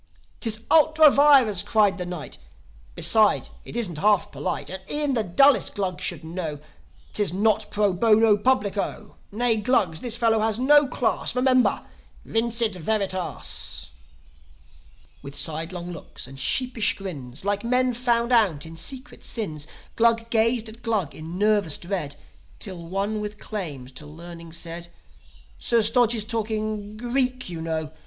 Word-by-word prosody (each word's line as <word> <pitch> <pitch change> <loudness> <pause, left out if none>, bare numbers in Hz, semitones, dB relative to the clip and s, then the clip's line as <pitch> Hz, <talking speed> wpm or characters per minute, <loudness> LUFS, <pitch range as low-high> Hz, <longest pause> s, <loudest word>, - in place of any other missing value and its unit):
"'Tis 220 -2 -2
ultra 315 -1 +6
vires!" 270 -10 +5
cried 205 -3 +2
the 180 - -4
Knight. 175 -4 -7 0.6
"Besides, 215 -2 +2
it - - -7
isn't 180 -10 -1
half 205 0 +2
polite. 180 -1 -4
And 190 0 -5
e'en 295 -2 0
the 235 - +1
dullest 275 +10 +4
Glug 185 -3 -3
should 170 -3 -2
know, 160 -2 -5 0.6
'Tis 205 -5 0
not 215 +3 +1
pro 205 -2 +1
bono 220 +2 +4
publico. 210 -2 -1
Nay, 230 +1 +1
Glugs, 205 -8 +1
this 240 -3 -1
fellow 225 -2 +2
is 220 - -3
no 290 +3 +5
class. 250 -1 -1
Remember! 255 0 +2 0.4
Vincit 230 -1 +1
veritas!" 190 0 -2 1.3
With 140 +1 -9
sidelong 165 +4 -1
looks 165 - -9
and 135 +1 -11
sheepish 245 - +1
grins, 150 -7 -7
Like 205 0 -1
men 250 +1 +1
found 235 0 0
out 195 -12 +2
in 165 0 -10
secret 260 - -5
sins, 155 -10 -3 0.3
Glug 230 0 +2
gazed 230 0 +2
at 225 +2 -10
Glug 210 - -1
in 160 +3 -8
nervous 205 -6 +2
dread; 170 -6 -4 0.4
Till 185 -5 -5
one 200 +4 -2
with 210 0 -6
claims 150 -13 -6
to 150 +3 -11
learning 170 +2 -11
said, 170 0 -6 0.7
"Sir 235 -2 +2
Stodge 235 +1 +3
is 215 -2 -1
talking 215 -1 -3
Greek, 255 0 -1
you 165 -2 -6
know. 160 -1 -3
210 Hz, 145 wpm, -24 LUFS, 175-235 Hz, 1.3 s, ultra